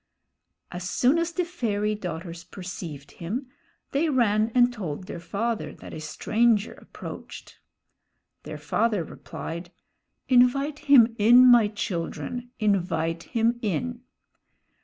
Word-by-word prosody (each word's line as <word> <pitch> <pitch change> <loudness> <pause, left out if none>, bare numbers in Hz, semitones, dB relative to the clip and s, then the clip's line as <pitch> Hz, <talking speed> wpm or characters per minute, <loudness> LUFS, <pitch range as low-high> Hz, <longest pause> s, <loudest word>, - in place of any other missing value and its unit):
As 180 0 -5
soon 265 - +3
as 335 0 -1
the 360 +1 -1
fairy 215 - -1
daughters 170 -3 -6
perceived 165 -7 -8
him, 240 +10 -5 0.4
they 305 +4 +1
ran 225 -5 +2
and 245 0 +5
told 185 -8 -5
their 175 - -7
father 215 +6 -3
that - - -11
a 160 - -6
stranger 215 +7 +1
approached. - - -10 0.8
Their - - -7
father 215 -6 0
replied, 170 +2 -8 0.6
"Invite 275 +4 +3
him 235 -5 +7
in, 240 +4 +7
my 240 -4 +7
children, 210 +5 -4
invite 170 -6 0 0.2
him 230 +1 +2
in." 240 +4 -2
215 Hz, 115 wpm, -26 LUFS, 175-245 Hz, 0.8 s, him